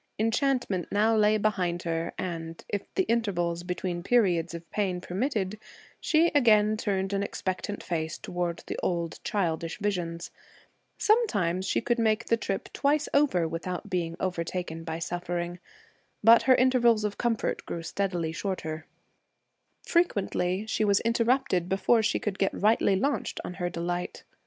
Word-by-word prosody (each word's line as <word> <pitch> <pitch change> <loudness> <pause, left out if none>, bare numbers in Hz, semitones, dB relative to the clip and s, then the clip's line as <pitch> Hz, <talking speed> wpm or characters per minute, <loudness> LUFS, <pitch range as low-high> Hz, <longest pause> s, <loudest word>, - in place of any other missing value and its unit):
Enchantment 225 - 0
now 220 +2 +3
lay 215 0 +4
behind 185 -5 0
her, 165 0 -2
and, 165 -2 -5
if 205 -1 -4
the 380 - +3
intervals 180 - 0
between 180 0 -3
periods 175 -6 +2
of 170 0 -9
pain 190 -4 -1
permitted, 205 +1 -2 0.4
she 330 +2 +3
again 215 -6 +5
turned 195 -2 -1
an 200 - +1
expectant 200 +1 -3
face 160 -2 -2
toward 175 -1 -3
the - - -4
old 170 -2 -2
childish 170 -5 -1
visions. 175 -5 -3 0.7
Sometimes 195 - +2
she - - +1
could 240 +1 0
make 225 0 +2
the 230 - +3
trip 195 -3 -3
twice 290 +1 +1
over 265 - +3
without 180 +4 -5
being 170 -2 -1
overtaken 175 -2 -3
by 160 0 -4
suffering. 175 +1 -3 0.6
But 230 +2 +8
her 255 - +8
intervals 240 -4 +4
of 210 -1 -3
comfort 235 -2 -1
grew 165 - -4
steadily 175 -3 -2
shorter; 160 -4 -4 1.0
frequently 200 - +1
she 220 - 0
was 200 -1 +4
interrupted 230 -6 +1
before 210 +5 +3
she 220 - +1
could 200 -2 -3
get 195 - 0
rightly 210 -1 +3
launched 275 +9 -1
on - - -5
her 175 - 0
delight. 175 +1 -4
190 Hz, 145 wpm, -28 LUFS, 175-225 Hz, 1.0 s, But